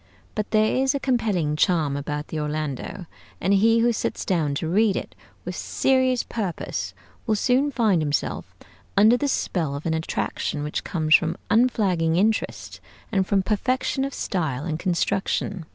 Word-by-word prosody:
But 215 -1 -3
there 215 +1 +2
is 265 +1 +2
a - - 0
compelling 210 - 0
charm 155 -3 +2
about 145 +1 -4
the 160 - -3
'Orlando,' 150 +3 -4 0.3
and 190 +3 +1
he 225 +3 +4
who 240 0 +3
sits - - -3
down 155 -6 0
to 160 - -2
read 200 +3 +3
it - - -4 0.3
with - - -4
serious 260 -2 +1
purpose 200 -7 -4 0.3
will 220 - +3
soon 255 +6 +2
find 220 - +2
himself 145 -2 -2 0.4
under 215 +4 +7
the 285 +3 0
spell 165 - -1
of 145 - -7
an 165 - +1
attraction 160 -2 -2
which 150 - -3
comes 155 -3 0
from 165 0 +4
unflagging 195 -9 +2
interest 215 +5 -1 0.3
and 190 -3 +1
from 195 -2 +2
perfection 255 +6 0
of 275 - -2
style 155 -8 -2
and 160 -2 -3
construction. 185 0 -1
190 Hz, 160 wpm, -24 LUFS, 160-225 Hz, 0.4 s, under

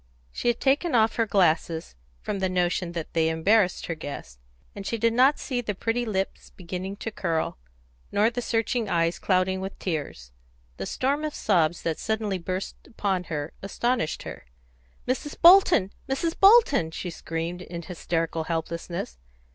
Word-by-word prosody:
She - - -4
had 240 -1 +2
taken 285 +3 +2
off 225 0 +3
her 230 -1 +2
glasses, 165 - +1 0.3
from 200 - -3
the 190 -1 0
notion 180 -1 0
that 165 -2 -5
they 160 -1 +2
embarrassed 180 +4 +2
her 165 - -2
guest, 145 - -8 0.4
and 200 - -6
she 230 - -2
did 230 +1 +2
not 260 +5 +5
see 250 -3 -2
the 210 -4 -3
pretty 230 +5 -1
lips 195 -2 -3
beginning 185 +2 -6
to 225 +2 -5
curl, 165 - -2 0.5
nor 215 +3 +3
the 245 +1 -3
searching 225 -1 0
eyes 165 0 +1
clouding 185 0 +1
with 195 +1 -6
tears; 145 - -4 0.5
the 95 - -4
storm 280 +4 0
of 305 -1 -3
sobs 170 -5 +1
that 165 -2 -1
suddenly 215 -3 -1
burst 185 +2 -4
upon 195 -5 -1
her 150 -1 -4
astounded 235 -1 -1
her. - - -9 0.6
"Mrs. 265 +4 -2
Bolton! 345 - +7 0.2
Mrs. 325 +5 0
Bolton!" 390 - +6
she 175 +2 -5
screamed, 165 +2 -4
in 170 -1 -7
hysterical 165 -2 -2
helplessness. 165 - -4
190 Hz, 160 wpm, -26 LUFS, 165-230 Hz, 0.6 s, Bolton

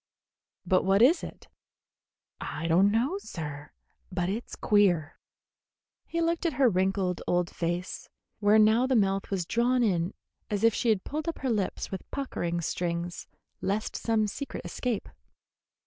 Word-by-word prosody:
"But 185 +1 +3
what 195 +3 +4
is 320 +7 +5
it?" - - -9 0.9
"I 160 - -5
don't 180 +5 +5
know, 250 - +1
sir; 150 - -7 0.4
but 180 -1 -1
it's 220 +5 -4
queer." 180 -7 +2 0.9
He 335 - -1
looked 335 0 0
at 325 - -1
her 270 -2 +5
wrinkled 190 -2 +1
old 175 0 +1
face, 175 +2 -3 0.3
where 210 +1 +5
now 220 +4 +5
the 260 - +2
mouth 195 -3 +1
was 190 -4 -1
drawn 240 +5 +2
in 180 -4 0 0.3
as 205 0 -1
if 230 -1 +5
she 235 - 0
had 210 -4 +2
pulled 305 +2 -4
up 335 - -2
her 265 -3 -1
lips 205 -4 -2
with 190 - -6
puckering 175 -11 -2
strings 170 +1 -3 0.3
lest 205 +3 -1
some 225 -2 +1
secret 275 +7 -5
escape. 240 -5 -2
200 Hz, 150 wpm, -28 LUFS, 180-240 Hz, 0.9 s, is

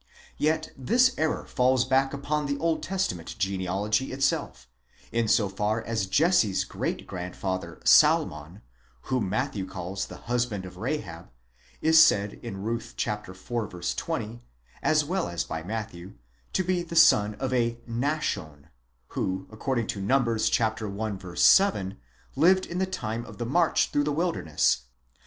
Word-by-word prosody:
Yet 155 +1 0
this 250 - +3
error 155 0 -1
falls 130 0 +2
back 135 +1 +2
upon 145 +1 -2
the 140 0 -1
Old 165 +1 0
Testament 185 - -3
genealogy 100 +4 -1
itself, 135 - -1 0.4
in 115 -1 0
so 105 -1 +3
far 105 +3 -1
as 110 -4 -2
Jesse's 120 - +3
great - - -4
grandfather 90 -2 -5
Salmon, 75 +7 +4 0.4
whom 125 -7 -1
Matthew 95 -1 -2
calls 95 0 -5
the - - -10
husband 120 -5 -1
of 90 0 -10
Rahab, 105 - -4 0.5
is 160 0 +8
said 100 -7 +2
Ruth 115 +1 -4
iv. 95 -1 -3
20, 115 +3 -4 0.4
as 155 -1 +2
well 185 +3 -1
as 85 -1 -2
by 80 - -5
Matthew, 100 -1 -6 0.4
to 185 - +1
be 180 0 0
the 170 -1 -7
son 105 -9 +5
of 130 +3 -3
Nahshon, 120 - -2 0.4
who, 95 0 -2
according 120 +2 -1
to 100 - -4
Numbers 115 0 +2
i. 110 -3 -3
7, 100 - +4 0.4
lived 185 +6 +4
in 175 - -4
the 190 - +1
time 115 -10 -4
of - - -11
the 120 - -3
march 165 +7 +2
through 145 0 +1
the 150 - 0
wilderness 145 - +1
115 Hz, 140 wpm, -27 LUFS, 95-145 Hz, 0.5 s, is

